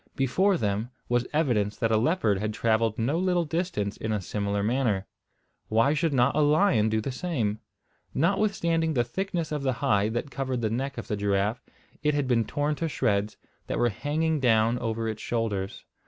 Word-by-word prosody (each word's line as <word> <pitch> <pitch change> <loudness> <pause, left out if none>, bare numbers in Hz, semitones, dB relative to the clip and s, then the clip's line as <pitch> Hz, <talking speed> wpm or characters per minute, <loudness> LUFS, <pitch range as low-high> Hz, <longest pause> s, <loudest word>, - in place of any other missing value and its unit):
Before 185 +9 +2
them 105 -1 -1 0.2
was 120 0 +1
evidence 115 -10 +1
that 115 - 0
a 110 - +4
leopard 110 - +2
had 105 +1 -2
travelled 110 -1 +1
no 135 +9 0
little 180 -2 +1
distance 160 - -2
in 110 - -3
a 105 - 0
similar 100 +1 -2
manner. 110 -4 +1 0.6
Why 115 +6 +3
should 155 +1 +1
not 130 0 +3
a - - +2
lion 145 - +4
do 110 0 0
the 135 - -3
same? 125 - -2 0.5
Notwithstanding 170 -2 +1
the 120 - +3
thickness 175 +2 -3
of 150 -1 -2
the 135 -1 +1
hide 105 -1 +1
that 135 +4 -3
covered 130 -2 -2
the 110 -2 0
neck 135 +4 -2
of 120 - -6
the 105 - -1
giraffe, 100 +3 0 0.4
it 150 0 +1
had 145 -2 0
been 115 -3 +2
torn 145 +1 -1
to 165 - -1
shreds, 105 -6 0 0.3
that - - -2
were 120 - +3
hanging 155 +7 -1
down 115 -1 +3
over 115 -1 -2
its 110 -1 -4
shoulders. 105 -5 -2
120 Hz, 185 wpm, -27 LUFS, 110-150 Hz, 0.6 s, a